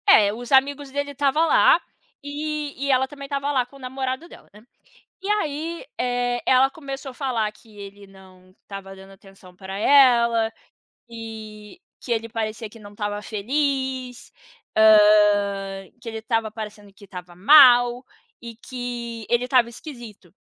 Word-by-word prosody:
É, 205 -1 +6
os 240 +3 -9
amigos 280 +1 +2
dele 285 +1 -3
tava 285 +4 +2
lá, - - +5 0.4
e 295 0 -4
e 280 - +1
ela 260 0 +2
também 280 0 -10
tava 280 0 -2
lá 255 -3 +1
com 250 - -21
o - - -18
namorado 260 +3 -4
dela, - - -16
né? 210 - -16 0.6
E 390 - -6
aí, 330 -2 -2
eh, 245 -1 -1
ela 260 +1 +4
começou 275 -2 -8
a - - -14
falar 245 -6 -2
que 215 0 -21
ele 200 0 -11
não 185 -1 -19
tava 195 -1 -8
dando 195 0 -14
atenção 195 -1 -17
pra 190 +1 -8
ela, 235 -3 +4 0.6
que 220 +1 -10 0.2
que 245 - -7
ele 230 0 -1
parecia 220 -1 -4
que 225 - -15
não 205 -1 -13
tava 205 0 -3
feliz, 260 +3 -3 0.5
hã, 205 -2 +4
que 240 - -14
ele 220 0 -6
tava 225 -1 -1
parecendo 210 -2 -9
que 200 0 -17
tava 180 -2 -10
mal 245 - +6 0.3
e 235 -1 -10
que 240 -2 -6
ele 240 +1 0
tava 250 -2 +3
esquisito. 235 - -12
235 Hz, 155 wpm, -23 LUFS, 210-270 Hz, 0.6 s, É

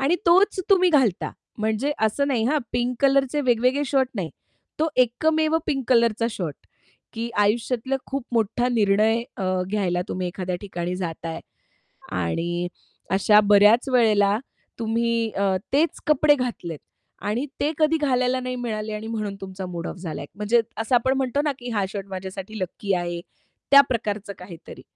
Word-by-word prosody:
आणि 290 +6 +2
तोच 375 +3 +4
तुम्ही 370 -2 +5
घालता. 260 - +2 0.3
म्हणजे 220 +7 0
असं 250 +6 +1
नाही 240 -5 +1
हां, 300 +4 +2
पिंक 245 +1 0
कलरचे 275 +1 +3
वेगवेगळे 255 +2 +2
शर्ट 265 -2 +2
नाही. 185 -7 -3 0.5
तो 320 +1 +2
एकमेव 310 +6 +2
पिंक 270 -3 -1
कलरचा 230 -2 +3
शर्ट 175 -8 -4 0.6
की 230 0 -4
आयुष्यातला 235 +5 +1
खूप 275 -2 -4
मोठा 230 +2 +1
निर्णय 220 0 +2
अ, 195 - -3 0.3
घ्यायला 185 -4 0
तुम्ही 185 0 -2
एखाद्या 180 0 -4
ठिकाणी 180 -3 -4
जाताय. 165 -2 -5 0.7
आणि 170 - -2 0.4
अशा 210 +2 +5
बऱ्याच 210 +6 +6
वेळेला 210 -4 +4 0.4
तुम्ही 230 0 0
अ, 195 -1 +2 0.2
तेच 310 +4 +1
कपडे 300 0 +5
घातलेत 235 - -4 0.4
आणि 230 +7 -1
ते 300 - +1
कधी 315 0 +3
घालायला 255 -3 +1
नाही 255 0 -4
मिळाले 220 -3 -4
आणि 215 +1 -5
म्हणून 215 -3 -3
तुमचा 190 0 -6
मूड 175 -2 -5
ऑफ - - -6
झालाय. 175 -3 -6
म्हणजे 210 +4 +2 0.2
असं 225 +3 -1
आपण 245 +2 +3
म्हणतो 265 +1 0
ना 295 -1 0
की 245 0 -7
हा 205 -4 0
शर्ट 195 0 -6
माझ्यासाठी 190 +3 -6
लकी 195 +2 -2
आहे, 175 -1 -2 0.5
त्या 280 - +10
प्रकारचं 210 -4 -2
काहीतरी. 180 -2 -11
225 Hz, 155 wpm, -24 LUFS, 195-260 Hz, 0.7 s, त्या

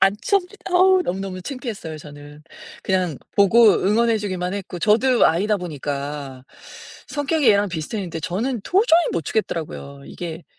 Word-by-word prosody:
안 195 +1 +4
췄니 395 -3 +1 0.2
어 370 +1 +5
너무너무 190 - -4
창피했어요 220 - -6
저는. 145 0 -12 0.4
그냥 185 -5 0 0.2
보고 210 +2 +6
응원해 220 +5 +2
주기만 185 -3 -3
했고 185 -3 -6
저도 235 +6 +4
아이다 205 +6 +1
보니까. 145 -5 -5 0.6
성격이 290 -1 +1
얘랑 205 -1 +4
비슷했는데 170 +1 -4
저는 220 - -2
도저히 365 - +4
못 165 -3 -2
추겠더라고요. 150 -8 -4
이게 165 -1 -7
195 Hz, 335 characters per minute, -21 LUFS, 160-235 Hz, 0.6 s, 보고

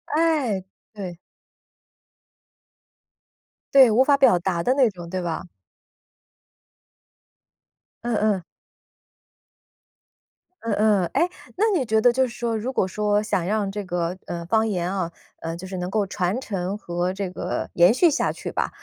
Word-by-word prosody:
哎， 300 - +1 0.3
对。 185 -5 -7 2.6
对， 265 -4 +8
无 240 +5 +5
法 280 +1 +4
表 265 -10 +5
达 175 -1 -1
的 255 - +3
那 265 -4 +4
种， 175 -4 -10
对 185 +1 -3
吧？ 170 -2 -3 2.6
嗯 240 -1 -1
嗯。 210 -3 +1 2.2
嗯 225 -2 -2
嗯， 210 -3 +3
哎， 350 - +2 0.3
那 415 - +2
你 260 - -1
觉 220 0 +2
得 245 +2 +6
就 260 +2 +2
是 - - -8
说， 235 -2 -1
如 250 +5 -3
果 190 - +2
说 210 +2 0
想 180 -4 -1
让 205 0 0
这 205 +1 -4
个， 175 0 -2
呃， 170 -1 -5
方 220 +5 +2
言 180 -3 -1
啊， 185 -4 -1 0.3
呃， 165 0 -4
就 175 +2 -8
是 185 0 -6
能 180 0 -3
够 210 +1 0
传 190 +5 -2
承 195 -3 -3
和 175 -2 -2
这 195 -1 -3
个 180 - -4
延 175 +5 +6
续 325 +6 +4
下 - - +1
去 - - -6
吧， - - -1
205 Hz, 160 characters per minute, -23 LUFS, 180-230 Hz, 2.6 s, 对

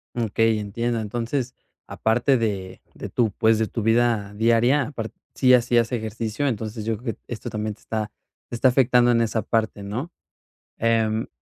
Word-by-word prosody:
Okey, 115 -1 +1
entiendo. 115 +3 -2
Entonces, 120 +4 -3 0.3
aparte 120 +4 +1
de 100 -5 -3
de - - -7
tu, 115 -3 +1
pues, 110 +1 +3
de 110 - +1
tu 115 - -4
vida 115 -2 +2
diaria 115 +6 +3
apar 120 -5 -5 0.2
si 130 -1 +5
hacías 120 -1 +3
ejercicio, 110 +3 -2
entonces, 110 -2 -4
yo 115 0 -1
creo 115 0 -4
que - - -33
esto 120 - -6
también 105 0 -3
te - - -27
está 110 -1 -3 0.4
te - - -7
está 130 - +4
afectando 125 -1 +4
en 115 -1 +3
esa 115 -1 0
parte 110 -3 -1
¿no? 115 +11 -4 0.7
Em 110 -1 +1
115 Hz, 170 wpm, -23 LUFS, 110-120 Hz, 0.7 s, si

